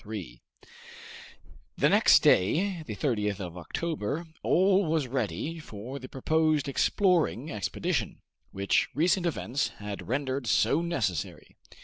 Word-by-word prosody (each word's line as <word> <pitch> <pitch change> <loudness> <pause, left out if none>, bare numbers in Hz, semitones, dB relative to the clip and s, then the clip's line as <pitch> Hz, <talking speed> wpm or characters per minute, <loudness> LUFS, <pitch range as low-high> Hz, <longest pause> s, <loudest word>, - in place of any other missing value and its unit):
Chapter - - -25
3 95 - -7 1.4
The - - +4
next - - +5
day, 170 - +3
the 105 - -5
30th 105 -2 -1
of 90 -3 -6
October, 150 - -3 0.2
all 190 +2 +3
was 155 -2 +1
ready 130 - -3
for 125 0 -8
the 130 - -10
proposed 155 +1 +1
exploring 160 - +1
expedition, 105 -3 -2 0.3
which 100 0 +1
recent 175 +4 +2
events 140 -4 -1
had 105 -1 -7
rendered 130 0 -2
so 150 +7 +3
necessary. 120 - -3
135 Hz, 120 wpm, -28 LUFS, 105-160 Hz, 1.4 s, next